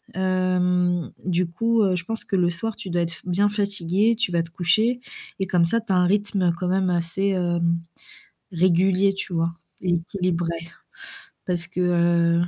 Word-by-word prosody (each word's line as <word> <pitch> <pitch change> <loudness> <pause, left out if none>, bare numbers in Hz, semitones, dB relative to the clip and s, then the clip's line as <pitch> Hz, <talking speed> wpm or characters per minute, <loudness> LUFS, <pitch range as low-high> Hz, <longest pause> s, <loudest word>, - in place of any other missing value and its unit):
hem, 180 -2 +1
du 180 -1 +1
coup, 230 +6 +1
heu, 190 -2 +2
je 170 - -3
pense 225 +2 -4
que 195 - -2
le 175 -2 +3
soir 205 +6 -2
tu 190 - -8
dois 175 0 0
f - - +1
être - - -6
bien 185 +3 +2
fatigué, 200 +1 +1
tu 215 - 0
vas 170 -1 +2
te 165 - -10
coucher 215 +8 +2 0.4
et 190 - -1
comme 175 -2 +2
ça 230 +7 +1
tu 215 -3 -2
as - - +3
un 180 - +4
rythme 195 -2 +1
quand 180 - -3
même 190 0 +1
assez, 175 +3 0
hem, 175 -2 0 0.7
régulier, 185 +3 +3
tu 190 -2 -5
vois? 165 0 0 0.3
Équilibré 175 -1 -1 1.0
parce 175 -1 +1
que 180 0 -6
heu, 170 -1 +2
180 Hz, 180 wpm, -23 LUFS, 175-195 Hz, 1.0 s, un